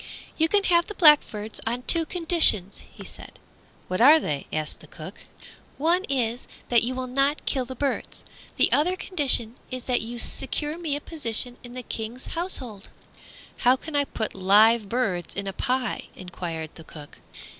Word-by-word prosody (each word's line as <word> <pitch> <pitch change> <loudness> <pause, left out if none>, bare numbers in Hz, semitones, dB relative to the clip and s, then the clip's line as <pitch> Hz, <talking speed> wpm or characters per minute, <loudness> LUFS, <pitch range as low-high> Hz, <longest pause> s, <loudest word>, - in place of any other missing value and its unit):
"You 320 - +2
can 405 +1 +3
have 345 -2 +2
the 420 - -8
blackbirds 250 - +3
on 240 +2 -2
two 330 +3 +2
conditions," 325 - +3
he - - -12
said. - - -11 0.5
"What 185 +4 -2
are 300 +6 +8
they?" 145 - -4
asked 155 -1 -3
the - - -15
cook. - - -11 0.5
"One 340 +6 +2
is 245 -3 -2 0.2
that 240 -1 +4
you 250 +2 -1
will 260 0 -3
not 275 +4 0
kill 260 -3 -1
the 260 +1 -8
birds. 275 +2 -4 0.3
The - - +3
other 335 +6 +2
condition 270 - 0
is 255 -1 -6
that 250 -1 0
you 235 +2 -6
secure 295 +5 -1
me 315 -5 -2
a 290 - -5
position 245 -6 -1
in 245 0 -12
the 255 - -6
King's 230 +3 -6
household." 255 - -5 0.7
"How 250 +1 +4
can 305 +3 -8
I 285 0 +2
put 220 -5 -4
live 210 +3 +4
birds 195 -8 -2
in 200 - -3
a 195 - -4
pie?" 250 +2 -1
enquired 170 -3 -7
the 165 - -13
cook. 150 -2 -13
250 Hz, 175 wpm, -24 LUFS, 215-300 Hz, 0.7 s, are